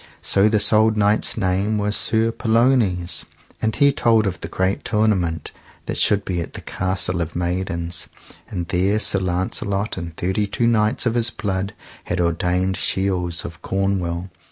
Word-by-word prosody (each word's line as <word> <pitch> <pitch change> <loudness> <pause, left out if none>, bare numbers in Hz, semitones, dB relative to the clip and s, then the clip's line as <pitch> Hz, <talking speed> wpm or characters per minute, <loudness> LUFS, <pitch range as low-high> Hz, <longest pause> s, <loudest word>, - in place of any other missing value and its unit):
So 100 +2 +3
this 105 0 +3
old 110 0 +4
knight's 105 +1 +2
name 95 +3 0
was 105 0 0
Sir 115 0 +2
Pellounes, 115 -7 +1 0.4
and 110 0 0
he 140 -1 +4
told 115 -3 +3
of 95 -2 -3
the - - -4
great 95 +1 -1
tournament 100 -7 0 0.3
that - - -3
should 100 -1 +3
be 90 -2 -2
at - - -7
the - - -8
Castle 95 -1 -1
of 85 0 -4
Maidens. 85 -1 -2 0.4
And 85 -4 -4
there 95 +3 +2
Sir 100 -2 +2
Launcelot 95 +3 -2
and 85 -2 -6
thirty 100 +3 0
two 115 +4 -1
knights 110 0 +2
of 115 - +2
his 120 0 +1
blood 100 -2 -3 0.3
had 90 - -2
ordained 90 +2 0
shields 90 -3 0
of 85 -1 -9
Cornwall. 95 -2 -2
95 Hz, 160 wpm, -21 LUFS, 90-110 Hz, 0.4 s, old